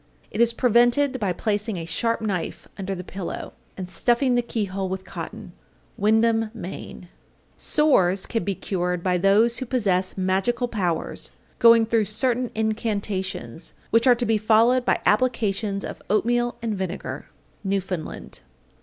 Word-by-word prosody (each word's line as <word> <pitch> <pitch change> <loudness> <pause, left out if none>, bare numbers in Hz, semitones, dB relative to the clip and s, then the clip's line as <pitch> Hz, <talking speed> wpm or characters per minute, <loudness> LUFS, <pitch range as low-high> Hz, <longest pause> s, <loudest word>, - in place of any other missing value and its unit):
It 215 - -1
is 235 0 +5
prevented 245 +3 +3
by 200 -4 0
placing 210 +2 -1
a 165 - -5
sharp 230 +9 0
knife 195 -6 -3
under 195 -1 -4
the 180 - -6
pillow, 185 0 -6 0.2
and 185 -2 -5
stuffing 245 +6 +2
the 245 - +3
keyhole 195 -5 -3
with 190 0 -4
cotton. - - -8 0.4
Windham, 225 +1 +2
Me. 185 -5 -6
828. 180 -2 -9 0.5
Sores 195 - +2
can 225 - -2
be 200 -1 -2
cured 180 -1 -2
by 180 -1 +1
those 210 +5 +3
who 260 - -4
possess 195 -8 0
magical 195 +7 +1
powers 180 -8 -2 0.3
going 230 -1 +7
through 225 -1 +2
certain 245 +3 0
incantations, 200 - -2 0.2
which 230 +2 +4
are 250 - +7
to 240 0 -1
be 220 -2 +2
followed 230 +4 +4
by - - +2
applications 210 -3 +1
of - - -7
oatmeal 240 +3 +1
and 225 -2 -1
vinegar. 190 -1 -5 0.4
_Newfoundland. 190 -4 -3
215 Hz, 145 wpm, -24 LUFS, 190-235 Hz, 0.5 s, going